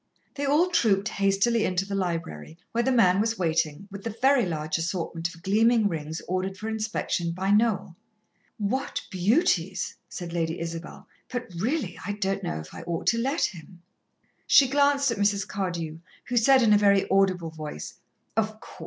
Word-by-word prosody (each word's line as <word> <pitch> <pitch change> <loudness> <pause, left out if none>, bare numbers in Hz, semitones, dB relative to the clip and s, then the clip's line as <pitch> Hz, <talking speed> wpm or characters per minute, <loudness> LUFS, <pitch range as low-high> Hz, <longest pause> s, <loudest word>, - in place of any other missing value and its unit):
They 285 - -3
all 310 +6 +3
trooped 215 - +2
hastily 200 +4 +2
into 185 +1 0
the 200 - -6
library, 165 - -3
where 235 +1 +1
the 265 - +1
man 200 -6 +4
was 225 +1 0
waiting, 165 +1 -1
with 200 0 -8
the 230 - -2
very 250 +1 +3
large 155 -1 -2
assortment 165 -1 -2
of 165 - -18
gleaming 220 +3 +3
rings 160 -3 -4
ordered 185 +1 -2
for 215 - -6
inspection 215 -6 -2
by 190 +3 -1
Noel. 205 -5 +2 0.6
"What 220 +6 -2
beauties!" 190 - +1 0.2
said 175 -2 -6
Lady 165 -1 -1
Isabel. 165 0 -7 0.2
"But, 245 -6 -4
really, 225 - -2
I 205 - -3
don't 195 -1 -1
know 75 - -3
if 80 0 -10
I - - -8
ought 170 -1 -4
to 230 - -1
let 270 +7 0
him." 175 -1 -5 0.6
She 275 - +7
glanced 280 0 +3
at 225 - -3
Mrs. 205 0 +1
Cardew, 170 -5 -4 0.3
who 245 - -4
said 260 +2 +5
in 215 -2 +5
a 205 - +5
very 200 -1 +4
audible 185 -4 +2
voice: 155 - -7 0.4
"Of 215 0 -1
course. - - -14
195 Hz, 175 wpm, -26 LUFS, 170-230 Hz, 0.6 s, She